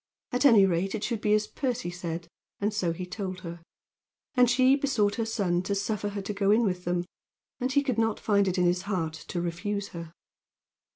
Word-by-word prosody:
At 250 +3 +4
any 215 -7 +7
rate 190 +3 0
it 215 - -4
should 230 -1 -2
be 210 0 +3
as 215 0 +1
Percy 240 - -3
said, 170 -1 -5 0.3
and 205 +1 0
so 185 -5 0
he 180 +2 -5
told 185 0 -5
her. 170 -2 -7 0.7
And 250 -3 +5
she 255 +2 +5
besought 250 -8 +1
her 225 -1 -1
son 185 -6 0
to 200 +2 -2
suffer 205 +1 -1
her 200 -1 -5
to 210 - -3
go 200 -1 +1
in 220 +3 +5
with 180 -4 -1
them, 175 0 0 0.5
and 255 +1 -1
he 285 +1 +3
could 255 -5 -1
not 225 -1 +1
find 200 -2 +2
it 185 0 0
in 180 - +3
his 175 +1 +2
heart 165 -6 -1
to 175 - -3
refuse 195 +4 -3
her. 170 -1 -8
200 Hz, 215 wpm, -28 LUFS, 180-225 Hz, 0.7 s, any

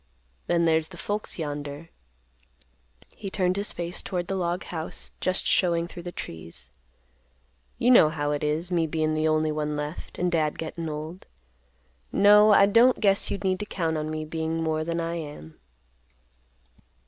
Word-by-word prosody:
Then 170 -1 +2
there's 160 -1 +2
the 175 - -13
folks 210 +3 -3
yonder." 145 0 -5 1.3
He 200 - -6
turned 185 -2 +1
his 200 +1 -1
face 175 +1 -5
toward 180 -2 -3
the 195 - -3
log 175 0 -1
house, 160 -2 -5
just 185 +1 0
showing 170 -2 +2
through 175 - -9
the 175 0 -6
trees. 80 - -9 1.1
"You 245 - +3
know 195 -11 +7
how 145 -1 -2
it 145 0 -2
is, 155 +4 0
me 165 -2 +2
bein' 155 0 0
the 155 0 +1
only 155 0 +2
one 150 0 -2
left, 150 +2 -6
and 180 0 0
Dad 155 -3 +1
gettin' 165 0 -5
old. 155 +4 -7 0.8
No, 210 +1 +6
I 200 - +7
don't 230 +5 +5
guess 200 -2 +2
you - - -1
need 190 -1 -1
to 210 - -4
count 165 -6 -1
on 155 0 -2
me 155 0 -3
bein' 160 +1 -2
more 160 -1 0
than 170 +1 -2
I 165 0 -2
am." 145 - -9
165 Hz, 170 wpm, -26 LUFS, 155-185 Hz, 1.3 s, know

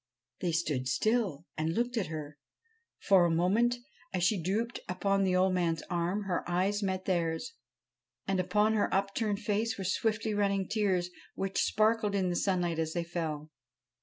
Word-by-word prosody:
They 175 - 0
stood 150 -6 -1
still 195 - 0
and 160 +1 -1
looked 240 +2 0
at 210 -7 0
her. 150 -2 -7 0.6
For 195 -3 +5
a 175 - +3
moment, 195 +9 +2 0.4
as 185 -2 -1
she 185 +1 +2
drooped 220 +7 -1
upon 195 +2 +1
the 185 -1 +2
old 185 0 +3
man's 165 -3 0
arm, 175 +4 0
her 185 -3 -1
eyes 190 +4 +1
met 190 -1 -2
theirs; 165 -3 -1 0.7
and 195 -1 +1
on 210 +2 +4
her 215 - +1
upturned 200 +2 0
face 220 +2 0
were 195 - -4
swiftly 215 +3 0
running 200 -2 +1
tears 190 -5 0 0.2
which 195 0 -1
sparkled 215 -1 +2
in 185 -2 +1
the - - -1
sunlight 175 -3 0
as 160 0 -1
they 175 - -1
fell. 160 -3 -4
190 Hz, 165 wpm, -31 LUFS, 170-210 Hz, 0.7 s, For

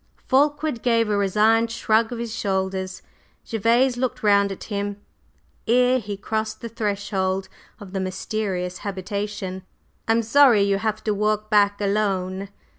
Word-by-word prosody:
_" - - -33
Fulkeward 290 -1 +1
gave 230 -3 +2
a - - +2
resigned 215 +3 +3
shrug 225 0 +1
of 240 - -4
his 230 -1 -4
shoulders; 190 -2 -2 0.4
Gervase 235 +3 +2
looked 250 -2 -2
round 200 -1 +4
at 195 - -7
him 205 -1 -4 0.7
ere 250 +2 +4
he 205 -3 -6
crossed 220 +2 -3
the 230 - -5
threshold 200 -4 -2 0.3
of 200 -3 -11
the 195 - -1
mysterious 185 -1 -3
habitation. 200 -1 -4 0.5
"I'm 225 +1 +3
sorry 235 -2 +5
you 200 -1 +1
have 215 0 -2
to 215 - 0
walk 215 +1 -1
back 205 -1 +4
alone." 195 -2 -1
210 Hz, 145 wpm, -23 LUFS, 195-230 Hz, 0.7 s, sorry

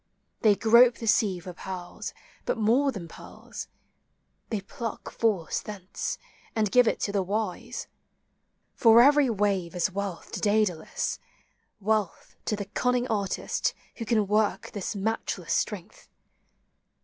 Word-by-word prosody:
They 215 -3 +5
grope 235 +3 +6
the 230 - -7
sea 210 -3 +3
for 180 +1 -8
pearls, 180 0 -6 0.3
but - - 0
more 240 +6 +3
than 190 -8 -7
pearls: - - -9 0.8
They 215 -3 -2
pluck 230 +2 -6
Force 205 -8 0
thence, 200 -3 -5 0.4
and 215 -3 +1
give 250 -2 +6
it - - +1
to 200 - 0
the 200 -1 +1
wise. 215 +4 -3 0.9
For 230 -1 +7
every 285 -1 +5
wave 195 -5 0
is 180 +1 +1
wealth 195 -2 -4
to - - -4
Daedalus, 205 -6 0 0.6
Wealth 210 -2 -1
to 215 - 0
the 205 -1 -4
cunning 250 +4 0
artist 200 -3 -1 0.2
who 230 - -4
can 220 -2 +2
work 210 +1 +1
This 205 +1 -4
matchless 200 -4 -2
strength. 205 -1 -3
210 Hz, 135 wpm, -27 LUFS, 190-230 Hz, 0.9 s, For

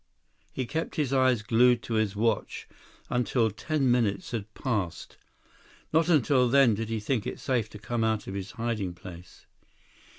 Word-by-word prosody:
He 130 - -3
kept 160 +6 -3
his 140 -4 0
eyes 130 -4 +3
glued 120 +2 +4
to 115 - -4
his 110 -2 0
watch 110 0 -1 0.4
until 120 -2 +1
ten 135 +4 0
minutes 115 -5 0
had 110 -3 -4
passed. 105 - -3 0.8
Not 160 +2 +3
until 135 -5 +3
then 135 -3 +5
did 110 +1 -3
he 115 -1 -1
think 110 +1 -1
it - - -5
safe 120 -5 -1
to 105 - -10
come 115 +3 -2
out 110 -1 0
of 95 - -6
his 100 0 -6
hiding 110 -6 -3
place. 90 0 -12
115 Hz, 165 wpm, -28 LUFS, 105-130 Hz, 0.8 s, then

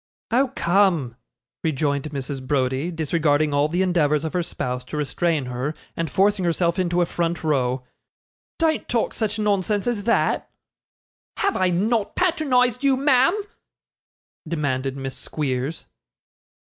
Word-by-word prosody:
'Oh, 260 +2 +2
come,' 170 - +2 0.5
rejoined 145 -2 0
Mrs. 135 -2 -5
Browdie, 135 +2 0
disregarding 155 -2 +1
all 145 +1 +3
the 175 +4 0
endeavours 155 -4 +2
of 160 - -3
her 180 - +1
spouse 125 -6 -4
to 150 - -6
restrain 150 0 0
her, 125 +5 -3 0.2
and 165 -2 -2
forcing 195 +4 +2
herself 170 +1 +1
into 175 -1 +2
a - - +1
front 170 0 -2
row, 130 -4 0 0.7
'don't 320 -2 0
talk 235 -2 0
such 215 -2 -1
nonsense 205 -1 +1
as 235 -5 -1
that.' 235 - +1 0.9
'Have 400 -2 +1
I 185 - +2
not 205 +4 0
patronised 270 -8 +2
you, 270 -2 +4
ma'am?' 275 +7 +4 1.1
demanded 140 -4 -1
Miss 135 -1 -5
Squeers. 140 +1 -3
170 Hz, 135 wpm, -23 LUFS, 145-205 Hz, 1.1 s, you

